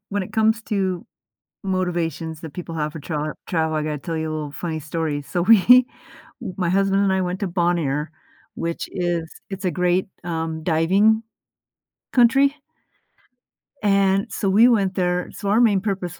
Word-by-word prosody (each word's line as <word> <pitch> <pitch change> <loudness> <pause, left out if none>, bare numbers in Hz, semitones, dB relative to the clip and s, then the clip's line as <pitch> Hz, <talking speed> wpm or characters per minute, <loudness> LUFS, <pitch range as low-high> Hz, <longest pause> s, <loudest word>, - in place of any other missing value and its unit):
when 205 -1 -2
it - - -9
comes 220 +1 +2
to 190 -4 -2 0.6
motivations 170 -4 -2
that 160 -3 -9
people 170 -2 -6
have 150 -1 -2
for 160 - -8
tra 150 0 -3
travel, 160 -2 0
I 155 - 0
gotta 150 -1 -3
tell 165 +3 -5
you 160 0 -2
a - - -3
little 150 -2 -5
funny 160 +1 -4
story. 155 -1 -3
So 175 +5 -2
we 230 +5 +7 0.7
my 180 -3 0
husband 195 +1 +2
and 195 -1 +2
I 190 - +1
went 180 +1 -2
to 200 - -1
Bonaire, 170 -5 0 0.5
which 170 0 -4
is 175 -2 -2 0.2
it's 195 0 -6
a - - +2
great, 180 +2 +1 0.2
um, 160 -2 -3
diving 190 +7 +3 0.9
country, 270 +3 +4 1.3
and 195 -1 +2
so 195 - -1
we 220 +5 +6
went 200 -6 +2
there 180 -1 0
so 200 -2 -5
our 220 +4 +4
main 205 -5 +4
purpose 190 -4 -3
180 Hz, 165 wpm, -22 LUFS, 160-195 Hz, 1.3 s, we